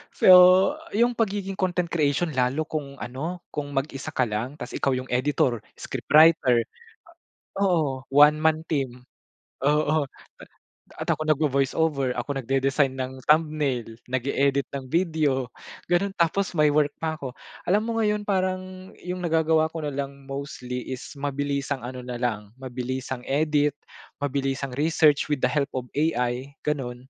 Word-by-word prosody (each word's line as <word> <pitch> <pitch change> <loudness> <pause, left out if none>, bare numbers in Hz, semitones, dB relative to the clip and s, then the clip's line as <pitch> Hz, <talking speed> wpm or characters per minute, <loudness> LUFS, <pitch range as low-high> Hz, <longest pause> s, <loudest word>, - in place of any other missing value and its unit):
So - - +4 0.7
yung 240 +2 +3
pagiging 200 -3 -1
content 180 -2 0
creation 155 +1 +1
lalo 130 +4 +1
kung 140 -3 -5
ano, 160 +8 -5
kung 145 -1 -3
mag-isa 135 0 -3
ka 130 - +2
lang, 115 +7 -3
tapos - - -7
ikaw 135 - +1
yung 130 0 -6
editor, 125 -2 +1 0.2
scriptwriter 150 -6 +4 0.9
o 200 - +1
oo, 170 -5 +3 0.3
one 150 +1 +7
man 160 0 +2
team 130 -5 -2 0.6
oo, 150 0 +2 0.4
a - - -10 0.6
at - - -4
ako 155 - 0
nagvo-voice-over, 140 -2 +1
ako 135 +3 -3
nagde-design 135 +1 +1
ng 130 0 -3
thumbnail, 150 -7 +1
nag-eedit 140 +2 0
ng 135 -1 -4
video, 155 -7 +1 0.4
ganon. 190 +3 +1
Tapos 180 +3 +1
may 150 -3 +4
work 145 0 +2
pa 160 -1 -2
ako. 135 -5 -6 0.4
Alam 205 +3 +4
mo - - 0
ngayon, 210 -1 +1
parang 185 -1 -2
yung 180 +1 -4
nagagawa 160 -1 +2
ko 165 - -4
na - - -1
lang 140 0 -5
mostly 125 -3 -5
is 130 0 -4 0.2
mabilisang 140 -1 -2
ano 125 +1 -6
nalang, 120 -4 -3
mabilisang 130 0 -5
edit, 150 0 +2 0.5
mabilisang 135 -1 -2
research 150 -1 +3
with 145 -3 -1
the 125 - +3
help 140 0 0
of 125 -1 -4
AI, 130 -3 0
ganon. 130 -3 -3
145 Hz, 140 wpm, -25 LUFS, 130-160 Hz, 0.9 s, one